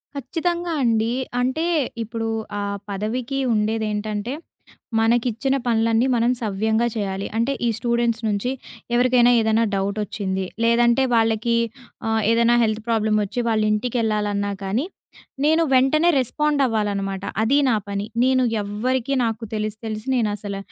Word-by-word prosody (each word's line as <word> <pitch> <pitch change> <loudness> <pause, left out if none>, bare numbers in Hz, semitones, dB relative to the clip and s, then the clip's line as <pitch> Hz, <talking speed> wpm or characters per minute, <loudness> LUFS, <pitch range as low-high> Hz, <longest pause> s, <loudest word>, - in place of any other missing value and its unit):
ఖచ్చితంగా 340 +5 -2
అండి. 225 0 +2 0.3
అంటే 260 +6 0 0.4
ఇప్పుడు 225 0 -4 0.3
ఆ - - -2 0.3
పదవికి 235 +7 -3
ఉండేదేంటంటే, 215 +1 -1 0.7
మనకిచ్చిన 240 +3 +1
పనులన్నీ 230 +1 +2
మనం 235 +1 +2
సవ్యంగా 220 +2 0
చేయాలి. 195 -2 -2
అంటే 245 +5 +1
ఈ - - +3
స్టూడెంట్స్ 235 0 0
నుంచి 210 +4 -1 0.4
ఎవరికైనా 245 0 +4
ఏదన్నా 220 0 +2
డౌటొచ్చింది. 195 -1 -2 0.2
లేదంటే 235 +2 +4
వాళ్ళకి 225 +1 +2 0.5
ఆహ్, 220 0 +1
ఏదన్నా 235 +1 +4
హెల్త్ 215 0 0
ప్రాబ్లమోచ్చి 215 0 0
వాళ్ళంటికెళ్ళాలన్నా 215 -2 0
కానీ, 215 - -1 0.6
నేను 320 +2 +4
వెంటనే 290 +6 +4
రెస్పాండ్ 295 +3 0
అవ్వాలన్నమాట 200 -4 -1 0.2
అది 255 +6 +3
నా 235 - +3
పని. 200 0 -3 0.2
నేను 260 0 +3 0.2
ఎవ్వరికీ 250 +6 -1
నాకు 225 0 -3
తెలిసి 215 0 -3
తెలిసి 215 +1 -5
నేనసల 205 -3 -2
225 Hz, 115 wpm, -22 LUFS, 210-245 Hz, 0.7 s, ఎవరికైనా